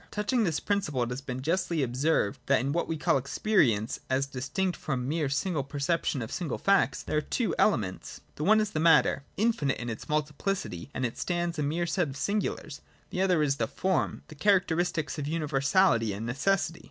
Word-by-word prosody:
J 170 - -24
Touching 220 +3 0
this 165 -4 0
principle 195 -11 0
it 120 - -3
has 125 +2 -4
been 130 -1 -5
justly 170 -1 0
ob 120 -1 -3
served 135 -7 +1
that - - +4
in 135 +4 -1
what 170 +3 0
we 165 - -2
call 140 - +2
Experience, 130 - +1
as 130 +1 +1
distinct 140 +8 -2
from 130 -4 -3
mere 150 -1 0
single 150 +1 -1
perception 140 -1 -1
of 110 - -7
single 175 -4 -3
facts, 195 -8 +2
there - - -1
are - - +2
two 230 - -1
elements. 105 - 0
The 150 - -5
one 215 +6 +5
is 215 -1 0
the 155 - -2
matter, 160 -3 +4 0.2
infinite 210 -11 +1
in 120 0 -4
its 110 - -8
multiplicity, 150 - -2
and 130 - 0
as 120 - -1
it - - -21
stands 175 -2 -1
a - - +1
mere 160 +4 0
set 170 0 0
of 135 - -7
singulars: 200 -5 -2 0.3
the 185 - -1
other 180 -5 +3
is 140 -2 +1
the - - 0
form, 190 -1 -1
the - - -11
characteristics 175 -4 +1
of 145 - -3
universality 145 - +2
and 105 +3 -5
necessity. 165 +7 0
155 Hz, 205 wpm, -28 LUFS, 135-180 Hz, 0.3 s, one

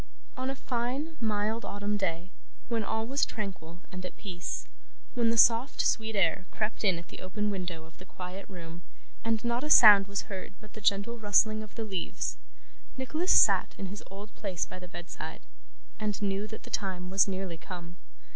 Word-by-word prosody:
On 255 +1 -2
a 270 - -2
fine, 260 +6 -2
mild 220 +1 0
autumn 205 +1 -2
day, 180 -2 -2 0.4
when 230 -2 0
all 220 +1 -1
was 275 +4 +1
tranquil 180 -5 -4
and 185 0 -6
at 180 - -7
peace: 180 -4 -5 0.5
when 235 -2 +3
the 230 - +2
soft 230 +4 +5
sweet 220 -1 +1
air 185 -1 +2
crept 215 +1 -2
in 190 -5 +3
at 170 - -10
the - - -10
open 210 +3 -2
window 175 -4 -4
of 160 - -18
the 185 - -11
quiet 185 +1 -8
room, 170 -2 -9 0.4
and 225 0 0
not 235 +2 0
a 300 - -2
sound 205 -7 +9
was 200 0 -2
heard 190 -1 -7
but 215 -1 -15
the 215 - -9
gentle 200 +4 +2
rustling 215 +1 +3
of 215 - -10
the 225 - -3
leaves: 190 -5 -2 0.6
Nicholas 310 +8 0
sat - - +6
in 195 - -4
his 200 +2 -6
old 200 +2 -9
place 180 -4 -2
by - - -9
the 180 - -9
bedside, 175 0 -7 0.6
and 210 -2 -1
knew 200 0 -1
that 220 +1 -9
the - - -12
time 185 -2 -2
was 195 +1 +5
nearly 185 -3 -3
come. 175 -1 -8
205 Hz, 190 wpm, -30 LUFS, 185-225 Hz, 0.6 s, sound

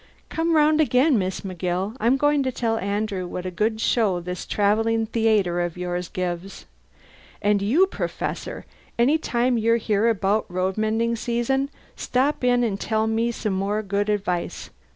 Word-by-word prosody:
Come 330 0 0
round 305 0 +4
again, 260 -1 +3
Miss 185 0 -2
McGill; 185 +2 -3
I'm 235 +5 +3
going 290 +1 +2
to 260 -1 -1
tell 225 -2 -1
Andrew 200 -2 -2
what 180 +1 -6
a 185 - -3
good 220 +4 0
show 215 -6 +2
this 180 +1 -6
travelling 225 +2 +1
theayter 215 -6 +1
of 175 0 -4
yours 180 0 -3
gives! 185 0 -4 0.7
And 205 -1 +2
you, 270 - +4
Professor, 385 - -4 0.3
any 270 +7 +3
time 245 -4 +1
you're 230 +1 +3
here 220 0 +1
about 210 0 +1
road 185 +1 -1
mending 225 +2 0
season, 240 +4 -1 0.3
stop 265 +2 0
in 245 -1 +3
an' 210 -4 0
tell 220 +1 0
me 225 +1 +1
some 215 -3 -3
more 200 +3 -1
good 200 +1 -1
advice. 195 -4 -2
220 Hz, 160 wpm, -23 LUFS, 195-240 Hz, 0.7 s, round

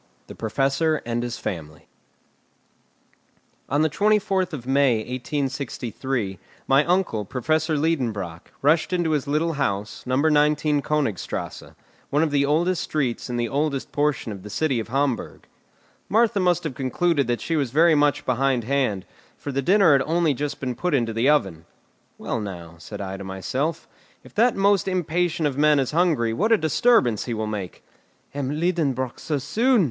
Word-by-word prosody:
THE - - -10
PROFESSOR 135 +7 0
AND 120 0 -1
HIS 120 -1 -4
FAMILY 75 -5 -6 1.8
On 145 +3 +2
the - - +4
24th 195 0 +1
of 135 -7 -6
May, 135 -1 +3
1863, 125 - -3 0.3
my 135 +2 +5
uncle, 175 - +1
Professor 155 - 0
Liedenbrock, 115 - -2
rushed 160 +5 +3
into 175 -3 +1
his 150 -3 0
little 155 +3 0
house, 105 -7 -2
No. 130 - +1
19 150 0 +3
Königstrasse, 140 -11 -3 0.3
one 145 +3 +2
of 160 - 0
the 140 -1 +2
oldest 170 +4 +1
streets 135 -5 -2
in 120 - -2
the 120 0 0
oldest 140 +1 -2
portion 145 -5 0
of 100 -2 -7
the 105 - -10
city 135 +3 0
of 110 - -4
Hamburg. 135 -1 -2 0.6
Martha 225 -1 +3
must 180 -2 +2
have 155 -4 -3
concluded 140 +3 0
that 120 -1 0
she 165 - -2
was 140 -5 0
very 160 +6 +4
much 145 -2 +2
behindhand, 130 -4 0 0.3
for 145 - -6
the 140 +1 -1
dinner 190 +3 +5
had 140 -2 +5
only 165 -1 +2
just 145 +2 -4
been 130 -2 -2
put 175 +4 -1
into 115 -4 0
the 115 +5 +2
oven. 95 - +1 0.5
"Well, - - -3
now," 90 -5 -7
said 85 - -8
I 95 0 -5
to 100 - -8
myself, 130 - -3 0.4
"if - - -16
that 235 +3 +3
most 195 -1 +2
impatient 175 -2 0
of 140 -1 -1
men 150 0 +5
is 135 -3 0
hungry, 150 -9 +2
what 210 - 0
a 225 - +6
disturbance 160 - +2
he 120 - -3
will 110 0 -2
make!" 105 -4 -5 0.5
"M. 140 -2 -3
Liedenbrock 145 -8 -1
so 150 - -2
soon!" 235 - +2
140 Hz, 165 wpm, -23 LUFS, 120-160 Hz, 1.8 s, a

